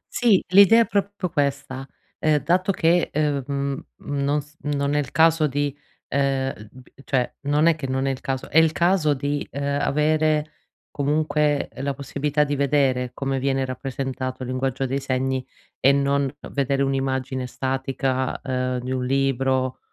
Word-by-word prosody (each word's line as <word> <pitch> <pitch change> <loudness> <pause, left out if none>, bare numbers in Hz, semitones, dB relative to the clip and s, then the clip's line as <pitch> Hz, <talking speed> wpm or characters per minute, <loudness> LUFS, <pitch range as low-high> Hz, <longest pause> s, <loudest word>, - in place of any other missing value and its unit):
Sì, 225 -6 +3
l'idea 200 +5 +7
è - - +3
proprio 200 -3 -2
questa: 140 -3 -2 0.3
uhm, 155 -1 +3
dato 185 +4 +2
che, 175 -1 +2
uhm, 145 -3 0
mhmm 140 -1 -2
mhmm 140 -1 -3
nos 150 +2 -2
non 145 -1 -1
è 150 - +2
il 140 - -3
caso 160 -1 +4
di, 145 0 -1 0.3
uhm 135 -1 0 0.2
b 130 -1 -15 0.2
cioè, 125 -3 0
non 150 +2 +3
è 165 -1 +5
che 145 -4 -5
non 130 +1 -1
è 135 - +1
il 130 - -6
caso 130 -1 -3
è 160 - +4
il 160 -1 +4
caso 170 -3 +2
di, 145 +1 -2
uhm, 140 0 -1
avere 155 0 +1 0.4
comunque 150 0 +1
la 135 +1 -2
possibilità 145 +2 0
di 145 0 -1
vedere 135 -3 +1
come 135 -1 -2
viene 135 0 0
rappresentato 130 0 -4
il 125 - -6
linguaggio 130 +1 -1
dei 135 +2 -1
segni 130 0 -1 0.4
e 135 - +5
non 140 -1 +1 0.2
vedere 140 0 0
un'immagine 130 -1 -1
statica, 130 0 -2
uhm, 130 -1 -1
di 130 +1 -5
un 130 -1 -1
libro 130 -1 0
140 Hz, 165 wpm, -23 LUFS, 130-150 Hz, 0.4 s, l'idea